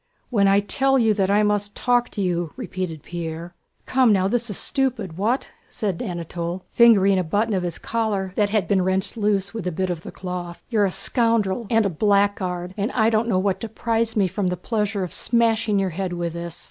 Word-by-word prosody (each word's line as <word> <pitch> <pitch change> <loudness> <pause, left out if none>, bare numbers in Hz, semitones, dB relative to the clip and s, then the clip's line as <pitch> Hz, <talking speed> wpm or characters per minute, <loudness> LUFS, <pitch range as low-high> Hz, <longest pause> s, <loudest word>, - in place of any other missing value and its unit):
"When 200 -4 +3
I 195 +1 +4
tell 270 +6 +2
you 225 -4 +3
that 195 -2 0
I 205 +1 +3
must 205 0 0
talk 245 -1 +1
to 200 - -3
you!..." 175 -3 -1
repeated 185 - -5
Pierre. 170 0 -6 0.3
"Come 255 -3 +3
now, 190 -2 +3
this 235 +2 0
is 205 - -3
stupid. 245 -10 -1
What?" 220 +8 -1 0.2
said 195 -5 -3
Anatole, 175 -2 -4
fingering 200 -5 +5
a - - 0
button 205 +7 0
of 190 - 0
his 175 -2 -3
collar 210 -5 -2
that 205 -1 +2
had 205 -5 0
been 195 0 +2
wrenched 190 +2 0
loose 205 -2 0
with 220 -5 -4
a - - 0
bit 185 +2 -2
of 170 -2 -4
the - - -9
cloth. 180 -2 -6
"You're 215 -3 +3
a 190 - -1
scoundrel 230 -1 +1
and 225 -2 +3
a - - +2
blackguard, 190 -1 0
and 205 +5 -1
I 225 -1 +3
don't 225 +1 +1
know 190 - +2
what 190 0 0
deprives 230 0 -1
me 195 -2 +3
from 190 +1 -2
the 180 0 -1
pleasure 210 0 -1
of 180 - -5
smashing 225 -3 +2
your 195 -2 0
head 185 +1 -3
with 170 -1 -3
this!" 170 -1 -6
200 Hz, 210 wpm, -23 LUFS, 180-225 Hz, 0.3 s, fingering